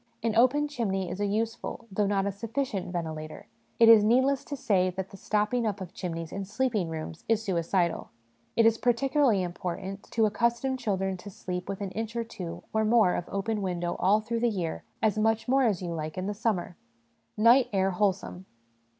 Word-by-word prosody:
An 230 -1 0
open 260 +6 +4
chimney 195 -10 -2
is 180 - -5
a 205 - +1
useful, 225 +3 -3
though 200 +1 +1
not 195 -1 +1
a 200 - 0
sufficient, 210 -2 -3
ventilator; 155 -3 -5 0.3
it 230 - +7
is 225 -2 +9
needless 260 +5 +3
to 285 - -5
say 185 -6 +2
that 190 +1 -5
the - - -10
stopping 210 +4 0
up 205 -1 -2
of 185 -2 -8
chimneys 165 -3 -5
in 195 - -4
sleeping 210 -3 -1
rooms 160 0 -6
is 225 -1 +2
suicidal. 175 -2 0 0.5
It 230 - +4
is 225 0 +4
particularly 245 -3 +2
im 175 -1 -4
portant 190 +3 -5
to 225 -1 +2
accustom 235 +4 +1
children 195 -6 -1
to 190 +3 -10
sleep 180 -1 -5
with 195 0 -4
an 195 -2 -3
inch 225 +2 -4
or 235 - 0
two, 185 -7 -7
or 220 0 +2
more, 215 -4 +4
of 175 - -3
open 205 +2 -2
window 175 -2 -2
all 205 +3 +4
through 230 +2 -2
the 240 +1 +2
year 180 -7 -3 0.2
as 215 -1 +2
much 225 +2 +1
more 270 +2 +3
as 200 -6 0
you 170 -1 -3
like 155 0 -5
in 185 - -2
the 205 - -2
summer. 200 -5 -2 0.6
Night 235 +4 +6
Air 195 -1 +2
Wholesome. 190 -1 -1
205 Hz, 200 wpm, -28 LUFS, 185-230 Hz, 0.6 s, is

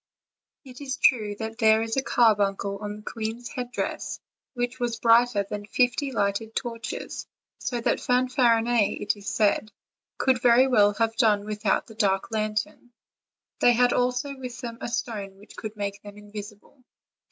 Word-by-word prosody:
It 255 0 -12
is 265 -1 -4
true 215 -5 +3
that 225 +2 -6
there 220 -1 +5
was 225 0 -2
a 270 - +2
carbuncle 200 -5 +2
on 210 0 -5
the 210 - -11
queen's 225 +2 -5
headdress, 250 -1 -4 0.4
which 245 +1 -2
was 240 -2 -2
brighter 230 -2 +4
than 205 0 -6
fifty 250 +4 +1
lighted 210 0 -1
torches, 235 -1 -5 0.3
so 245 -2 -3
that 230 - 0
Fanfarinet, 240 -3 +2
it - - 0
is 205 0 -6
said, 210 0 +1 0.5
could 260 -2 +2
very 245 +1 +6
well 205 -6 +4
have 225 0 0
done 210 -4 +3
without 210 -2 0
the 220 - -13
dark 200 -2 0
lantern: 215 +2 -3 0.7
they 245 - +5
had 245 +1 +3
also 250 +3 0
with 250 -2 -8
them 235 -2 -6
a - - -3
stone 210 -5 -4
which 205 +2 -16
could 215 -1 -7
make 200 -1 -4
them 205 0 -11
invisible. 210 +4 -11
225 Hz, 160 wpm, -26 LUFS, 210-245 Hz, 0.7 s, very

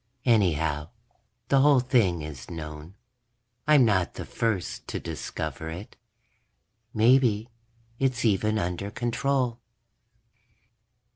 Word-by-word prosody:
Anyhow, 80 - +2 0.6
the 135 -1 +5
whole 145 -1 +6
thing 110 - +2
is 75 -4 -8
known; 75 +1 -8 0.7
I'm 150 -4 +6
not 95 -5 +1
the - - -6
first 110 -6 -2
to - - -3
discover 80 +1 -5
it. 90 +6 -8 1.0
Maybe 115 -1 +3 0.5
it's 130 -3 0
even 110 +1 +2
under 90 +1 -2
control. 120 +2 -1
105 Hz, 95 wpm, -27 LUFS, 85-120 Hz, 1.0 s, whole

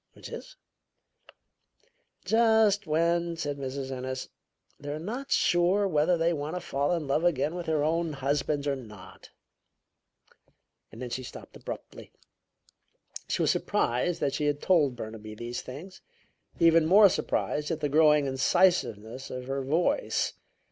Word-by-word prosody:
"Which - - -11
is?" - - -9 1.7
"Just 220 -3 +3
when," 170 +2 +1
said 145 -3 -3
Mrs. 135 0 -4
Ennis, 130 0 -5 0.5
"they're 145 +1 -5
not 235 - -5
sure 180 +4 +3
whether 165 +1 +2
they 165 +1 +2
want 150 +2 -4
to - - -2
fall 145 -3 -1
in 165 -3 -2
love 140 +4 0
again 155 -2 +1
with 175 -1 -6
their 155 -2 +1
own 165 +1 0
husbands 140 +1 -1
or 140 - +1
not." 105 -7 -12 1.6
Then 120 +2 -7
she 130 - -3
stopped 125 - -11
abruptly. - - -9 1.2
She - - 0
was - - +3
surprised 160 +9 0
that 140 - 0
she 150 +1 -1
had 145 0 0
told 150 -9 +2
Burnaby 110 -2 -8
these 120 +2 -5
things; 165 +9 -10 0.6
even 165 -1 +5
more 200 +4 +8
surprised 150 -4 -1
at 160 - -2
the 150 - +1
growing 150 0 +4
incisiveness 130 - +1
of 125 0 -6
her 135 +1 -2
voice. 160 - 0
150 Hz, 140 wpm, -28 LUFS, 135-170 Hz, 1.7 s, more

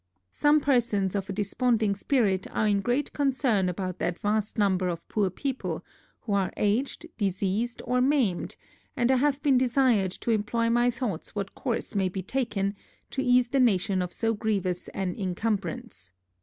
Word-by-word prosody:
Some 295 - +3
persons 235 -9 +1
of 195 -1 -3
a - - -1
desponding 215 +2 +1
spirit 200 -3 +1
are 215 - 0
in 200 -1 +2
great 245 +6 -1
concern 255 -9 +1
about 185 0 -4
that 175 - -1
vast 210 +1 -1
number 190 -3 +2
of 170 -1 -5
poor 205 -3 +1
people, 265 +8 -4 0.4
who 210 - -3
are 195 -2 +1
aged, 230 +10 0
diseased, 200 +4 -1
or 250 +1 +1
maimed; 255 -10 +1 0.4
and 240 +1 +3
I 260 - +4
have 285 +1 +2
been 275 -4 +4
desired 245 -6 +3
to 235 - 0
employ 230 +2 +1
my 240 +1 +3
thoughts 235 -9 -4
what 195 -1 -3
course 240 -4 -3
may 195 -3 +1
be 185 +1 -5
taken, 205 -4 -1 0.4
to 265 - -1
ease 245 -1 +3
the 270 +1 +1
nation 195 -5 +2
of 180 -1 -3
so 225 +3 0
grievous 200 -5 -1
an 190 -2 -3
incumbrance. 205 - -3
215 Hz, 170 wpm, -27 LUFS, 195-250 Hz, 0.4 s, I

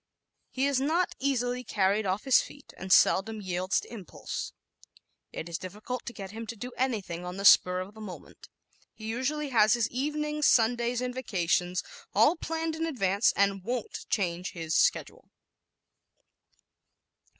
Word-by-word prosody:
He 265 +1 -1
is 280 -2 +1
not 330 +6 +1
easily 250 -2 0
carried 200 -1 +1
off 190 +3 -1
his 265 -2 +5
feet 285 - -12
and 190 0 -7
seldom 215 +5 +4
yields 185 -1 -1
to - - -12
impulse. 200 -7 -6 0.8
It 160 - -6
is 170 -1 -4
difficult 210 +7 -6
to 240 - -5
get 195 -3 -8
him 225 +1 -7
to 235 - -5
do 245 +4 -7
anything 205 -10 -2
on 180 +1 -6
the 200 - -4
spur 180 -2 +6
of 190 +3 -8
the 220 - -12
moment. 195 -4 -10 0.5
He 220 - -10
usually 270 +6 -2
has 220 -2 +5
his 235 -2 +1
evenings, 300 +3 0
Sundays 240 +1 +2
and 250 0 -2
vacations 180 -7 0 0.3
all - - +5
planned 325 -1 -3
in 325 +1 -2
advance 200 - +2
and 195 -1 +1
won't 245 +2 -4
change 180 -3 -1
his 165 -2 -4
schedule. - - +1
225 Hz, 155 wpm, -28 LUFS, 190-260 Hz, 0.8 s, spur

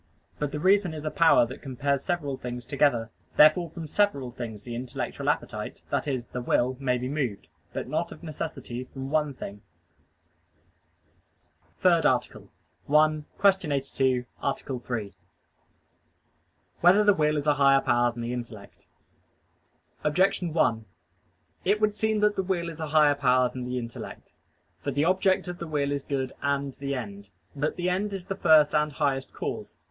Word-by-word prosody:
But 150 -2 -1
the 150 - -3
reason 190 -1 +3
is 155 0 -7
a 155 - -1
power 160 -7 +5
that 125 +3 -9
compares 140 0 -1
several 160 -7 -2
things 125 -1 -6
together: 125 -5 +1 0.2
therefore 155 +3 +6
from 165 0 -7
several 145 -8 0
things 115 -4 -7
the 120 - -7
intellectual 125 +1 -3
appetite - - -3
that - - 0
is, 130 -4 -2
the 125 - -6
will 125 +1 +1
may 125 -2 +1
be 125 +1 -3
moved; 130 - -3 0.2
but - - -4
not - - -2
of - - -11
necessity 150 -6 -5
from 135 +1 -8
one 150 -3 +1
thing. 100 -4 -7
_______________________ - - -21 2.2
THIRD - - +4
ARTICLE - - -1 0.4
[I, 155 0 +4 0.3
Q. 185 -6 -6
82, 135 -2 0 0.2
Art. 140 - -1 0.2
3] 110 -6 -4 1.7
Whether 185 +5 +6
the 205 -1 +6
Will 150 -4 +1
Is 145 - -2
a 150 - +4
Higher 140 -1 +5
Power 120 -1 +2
Than 120 0 -7
the 120 +1 -3
Intellect? 115 -5 -8 1.2
Objection 175 +2 +2
1: 115 -8 +1 0.8
It 205 +3 +2
would 215 -1 +2
seem 220 0 0
that 210 0 +3
the - - +1
will 180 -3 -2
is 160 - -11
a 160 - -3
higher 150 -1 +5
power 130 -3 +3
than 125 0 -6
the 125 0 -3
intellect. 115 -1 -7 0.5
For - - -1
the 145 +3 +1
object 185 +1 +2
of 175 0 -6
the 170 - -5
will 145 -2 -1
is 140 -1 -1
good 135 -2 -3
and 140 -1 -1
the 140 +1 -4
end. 100 -5 -7 0.3
But 145 +2 -1
the 180 0 -1
end 200 +3 -1
is 190 -2 -5
the 195 - -3
first 155 -5 +5
and 150 -1 +1
highest 135 0 -1
cause. - - -5
140 Hz, 170 wpm, -27 LUFS, 125-160 Hz, 2.2 s, therefore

